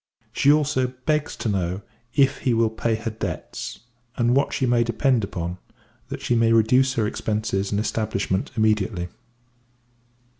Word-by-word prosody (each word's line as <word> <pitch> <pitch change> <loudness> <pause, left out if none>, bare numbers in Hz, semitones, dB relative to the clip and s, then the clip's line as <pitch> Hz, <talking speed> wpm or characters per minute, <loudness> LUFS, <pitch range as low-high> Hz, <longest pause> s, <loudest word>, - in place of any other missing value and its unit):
She 140 - +4
also 135 -4 +1
begs 150 -1 0
to - - -4
know, 95 -1 -1 0.3
if 135 -1 +3
he 125 -3 +1
will 115 -1 +2
pay 110 0 0
her 110 +1 -4
debts, 110 - -5 0.4
and 120 +1 +3
what 140 - +2
she 130 - 0
may 120 -1 +3
depend 120 +1 +1
upon; 90 -1 -4 0.5
that - - -5
she - - +1
may 115 -1 +3
reduce 125 +4 +4
her 110 - +1
expences 105 -2 -1
and 100 - 0
establishment 100 -3 -1
immediately. 105 -4 +1
115 Hz, 150 wpm, -24 LUFS, 105-125 Hz, 0.5 s, She